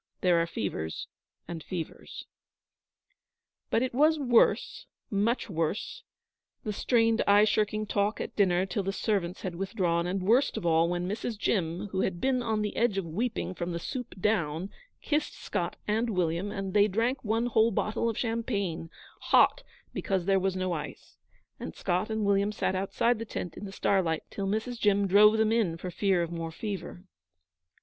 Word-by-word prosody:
There 175 -2 +4
are 165 - 0
fevers 80 - -4 0.4
and 170 -2 -6
fevers. 170 0 -7 1.4
But 230 - +2
it 255 - -2
was 305 +5 +4
worse 250 -5 +2 0.2
much 215 +4 +1
worse 180 - -2 0.6
the 210 - -3
strained, 225 +1 +2
eye 205 +1 +6
shirking 215 0 +1
talk 205 +1 0
at - - -5
dinner 185 -2 +3
till 195 +2 -2
the 195 0 -2
servants 195 -4 -1
had 185 - -3
withdrawn, 175 -2 -1
and 185 +1 -2
worst 230 +6 +3
of 205 - -4
all 165 0 +3
when 175 0 -1
Mrs. 220 +3 -3
Jim, 180 -3 -1
who 190 0 -1
had 175 -2 -1
been 260 +2 +1
on 220 -3 0
the 210 - -3
edge 230 -4 +2
of 195 - -1
weeping 195 +4 -2
from 175 -1 -4
the 170 - -2
soup 245 +1 -6
down, 180 -3 0 0.3
kissed 300 0 0
Scott - - -3
and 220 +3 +1
William, 180 -1 0
and 195 -2 -4
they 205 0 +5
drank 230 +6 0
one 225 +2 0
whole 225 -1 +3
bottle 220 +2 0
of 225 - -4
champagne, 210 -8 -2 0.4
hot, - - +5 0.3
because 190 -3 -1
there 195 0 +3
was 190 0 0
no 185 -1 -1
ice, 150 -3 -7 0.4
and 80 - -6
Scott 185 +3 -1
and 220 -1 -1
William 200 +1 +2
sat 205 - -1
outside 205 +5 +1
the - - -3
tent 180 -5 -5
in 205 - -7
the 195 - -7
starlight 185 -5 +1
till 195 -1 -3
Mrs. 220 +4 -2
Jim 205 -2 +3
drove 210 +3 +6
them 220 0 +2
in 210 -8 +1
for 180 +2 -6
fear 190 -2 +1
of 170 - -5
more 165 -1 -4
fever. 185 -1 -6
200 Hz, 175 wpm, -29 LUFS, 180-220 Hz, 1.4 s, eye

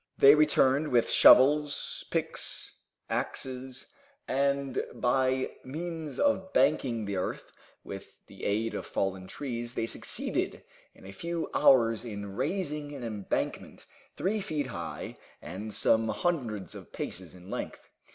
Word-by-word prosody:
They 140 +1 +9
returned 150 -1 +4
with 120 -4 +2
shovels, 145 +3 +5
picks, - - -2 0.3
axes, 130 0 -3 0.4
and 140 0 0
by 130 +1 +1
means 160 +2 -5
of 280 -10 +2
banking 130 -5 +2
the 100 -1 -2
earth 90 - -4 0.3
with - - -10
the - - -14
aid 110 +3 0
of - - -5
fallen 95 -1 -2
trees 120 0 -5
they - - 0
succeeded - - -2 0.3
in - - -16
a 95 - -8
few 170 +10 -4
hours 115 -3 +5
in 100 -4 -6
raising 150 - -2
an 135 - -7
embankment 105 -4 -3 0.3
three 205 +3 0
feet 155 -6 -2
high 85 -10 -6 0.2
and 100 +5 -7
some 110 +2 +3
hundreds 120 - -2
of - - -11
paces 90 -1 -6
in 90 +1 -12
length. - - -5
130 Hz, 130 wpm, -29 LUFS, 110-150 Hz, 0.4 s, They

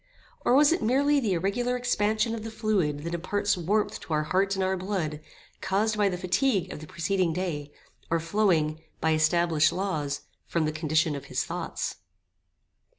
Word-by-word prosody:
Or, 245 - +4
was 290 +2 +6
it 340 - +1
merely 280 +5 +3
the 220 -7 0
irregular 200 +8 0
expansion 220 -2 +1
of 225 -2 -5
the 225 - -5
fluid 195 -10 0
that 170 +1 -4
imparts 205 +4 0
warmth 200 +5 0
to 160 - -6
our 150 0 +2
heart 195 +5 +1
and 190 - 0
our 190 0 +1
blood, 180 -5 -2 0.4
caused 210 +3 +1
by 205 -1 +3
the 180 - -3
fatigue 185 +1 +1
of - - -7
the 155 - -10
preceding 185 0 0
day, 155 -5 -3 0.4
or 165 - +2
flowing, 165 -4 +1 0.2
by 160 - +1
established 155 0 +3
laws, 160 -6 -2 0.3
from 165 -2 0
the 155 - 0
condition 155 0 +1
of 140 -1 -7
his - - -2
thoughts? - - -4
185 Hz, 175 wpm, -27 LUFS, 160-210 Hz, 0.4 s, was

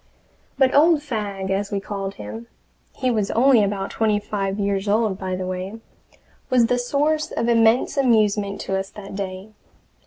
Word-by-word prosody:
But 265 -1 +3
Old 305 +1 +5
Fagg, 205 -7 -4
as 200 +1 -1
we 200 - -1
called 195 0 -5
him 230 +1 -8 0.5
he 255 -1 0
was 215 -4 0
only 245 -2 +4
about 195 -1 -2
twenty 215 -2 +1
five 200 -1 -3
years 200 0 -1
old, 210 -2 +1
by 185 -1 -3
the 185 0 -4
way 185 +4 -5 0.7
was 250 -2 +4
the 245 +2 +1
source 295 +5 0
of 230 - -2
immense 230 +3 +3
amusement 210 -6 +2
to 195 - -2
us 195 0 -5
that 200 -1 -10
day. 190 +1 -5
210 Hz, 165 wpm, -22 LUFS, 195-240 Hz, 0.7 s, Old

